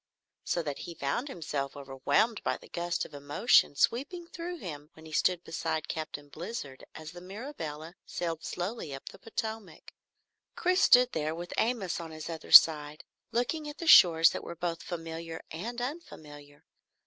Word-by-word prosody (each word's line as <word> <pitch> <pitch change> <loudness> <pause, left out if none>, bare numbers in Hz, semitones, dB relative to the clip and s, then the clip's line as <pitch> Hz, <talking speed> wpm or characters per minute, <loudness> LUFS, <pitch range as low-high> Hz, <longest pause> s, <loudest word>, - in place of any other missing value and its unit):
So 170 - -1
that 145 -3 -4
he 170 - -7
found 145 - -2
himself 145 - -4
overwhelmed 140 - 0
by - - 0
the - - -16
gust 175 0 -2
of - - -14
emotion 145 +4 +3
sweeping 285 - 0
through 345 +1 -6
him 150 - -8
when 160 - -15
he 160 - -11
stood 175 +3 +1
beside 160 -1 -3
Captain 155 -2 -5
Blizzard 155 - -7
as 155 -1 -8
the 175 - -11
Mirabelle 180 - -7
sailed 165 -2 -4
slowly 175 - -4
up 135 - -9
the - - -14
Potomac. 220 -1 -6 0.6
Chris 365 +2 +2
stood 250 -7 +6
there 155 0 -2
with 175 +1 -7
Amos 220 -7 0
on 165 -1 -7
his 155 +1 -7
other 160 - -8
side, 150 -1 +7 0.3
looking 295 +6 -1
at 295 - -9
the 335 - -6
shores 165 - +8
that - - -5
were 170 - -7
both 170 -1 -3
familiar 165 -1 -6
and 230 +10 -5
unfamiliar. 150 - -8
170 Hz, 165 wpm, -30 LUFS, 155-230 Hz, 0.6 s, shores